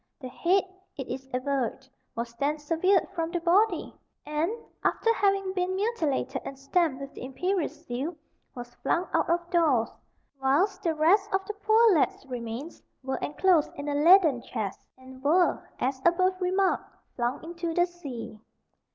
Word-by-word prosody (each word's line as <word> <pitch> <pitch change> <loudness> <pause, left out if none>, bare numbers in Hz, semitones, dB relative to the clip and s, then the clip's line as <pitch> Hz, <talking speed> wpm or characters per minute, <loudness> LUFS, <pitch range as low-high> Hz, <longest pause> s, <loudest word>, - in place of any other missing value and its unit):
The 260 -4 -7
head, 365 +8 +2 0.3
it 270 - -5
is 265 +1 -6
averred, 265 0 -2 0.3
was 235 0 -4
then 290 +2 +1
severed 330 +5 +2
from 330 -3 -2
the 345 0 -2
body, 360 +2 +2 0.3
and, 300 +3 0 0.3
after 455 - +2
having 390 -3 +1
been 370 0 -1
mutilated 310 - -1
and 270 - -7
stamped 280 +1 0
with 275 0 -8
the - - -9
imperial 355 +7 -1
seal, 270 +8 -5 0.4
was 245 -1 -8
flung 350 +2 0
out - - +1
of 345 0 +1
doors, 300 -10 +3 0.5
whilst 365 +9 +2
the 330 -4 0
rest 390 +7 +3
of 385 0 0
the 425 - -4
poor 435 +1 +4
lad's 305 -3 +1
remains 250 +4 -6 0.2
were 265 0 -2
enclosed 335 +1 +2
in 285 +1 -6
a - - -1
leaden 310 -3 +5
chest, 200 -4 -4 0.2
and 260 0 -14
were, 345 +5 +2
as 260 +1 -1
above 370 +2 +2
remarked, 375 +1 +1 0.2
flung 240 +1 -2
into 340 0 -4
the 350 - +4
sea. 280 -11 -8
325 Hz, 160 wpm, -27 LUFS, 265-370 Hz, 0.5 s, leaden